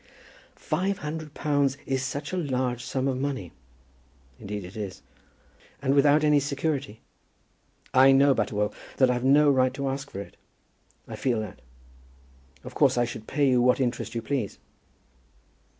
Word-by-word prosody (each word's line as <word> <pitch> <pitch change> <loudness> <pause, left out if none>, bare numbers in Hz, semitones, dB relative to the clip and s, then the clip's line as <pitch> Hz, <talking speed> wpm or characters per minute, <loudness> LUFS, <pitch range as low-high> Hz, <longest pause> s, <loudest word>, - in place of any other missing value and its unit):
"Five 195 +2 -1
hundred 150 0 -6
pounds 145 -2 +1
is 135 -1 -1
such 140 +6 -4
a - - -1
large 130 -6 -1
sum 130 +2 -2
of 130 -1 -1
money." 130 - -3 0.9
"Indeed 105 -1 -6
it 90 - -11
is." 100 -4 -6 0.8
"And 135 0 +1
without 145 +2 +4
any 150 -1 +5
security!" 140 -4 -3 0.9
"I 130 +1 +7
know, 135 +1 +5
Butterwell, 105 -5 -1 0.2
that 130 -2 +4
I've 125 0 -2
no 145 +2 +5
right 130 -1 +2
to 140 0 -3
ask 135 +1 -4
for 100 - -6
it. - - -12 0.7
I - - -6
feel 125 -4 0
that. 105 -4 -8 1.0
Of - - -9
course - - +3
I 120 - +3
should 110 -2 -8
pay 145 -2 +1
you 125 -2 +3
what 125 +2 +3
interest 120 -2 -2
you 115 - -3
please." 120 -5 -2
135 Hz, 155 wpm, -26 LUFS, 120-145 Hz, 1.0 s, I